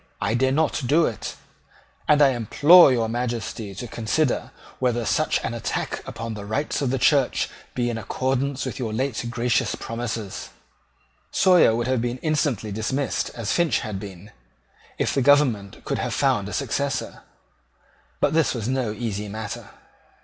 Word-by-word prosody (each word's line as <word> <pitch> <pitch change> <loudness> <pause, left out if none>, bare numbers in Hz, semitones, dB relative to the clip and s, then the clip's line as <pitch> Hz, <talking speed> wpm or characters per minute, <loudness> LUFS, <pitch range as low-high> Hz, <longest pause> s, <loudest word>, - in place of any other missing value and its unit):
I - - 0
dare 130 +2 +2
not 155 +2 +1
do 160 +5 +4
it; 115 - -4 0.7
and 150 -1 +5
I 140 - +6
implore 145 - +6
your 115 -3 +1
Majesty 115 -3 -3
to 120 +6 -6
consider 120 +6 -1 0.3
whether 120 -2 0
such - - +1
an - - -2
attack - - -3
upon 115 0 -5
the 105 -1 -7
rights 110 +11 -2
of 135 - 0
the 135 - 0
Church 135 0 +2 0.2
be 120 -1 0
in 115 -1 -2
accordance 130 +5 -1
with - - -5
your 115 -4 -3
late 130 +1 -1
gracious 120 -1 0
promises." 115 -4 -5 0.8
Sawyer 180 -11 +5
would 120 0 -1
have 130 -2 +1
been 120 +1 -2
instantly 145 -9 0
dismissed 130 +7 -1
as 115 -4 -3
Finch 170 -2 +2
had 105 -5 -4
been, 100 0 -10 0.7
if - - 0
the 135 - +1
government 125 -8 +2
could - - -2
have - - -2
found 125 -8 +1
a - - -7
successor: 140 +1 -2 1.0
but - - +2
this 160 -4 +2
was 115 -2 -3
no 130 -4 0
easy 105 -2 -4
matter. 105 0 -6
120 Hz, 160 wpm, -24 LUFS, 110-140 Hz, 1.0 s, I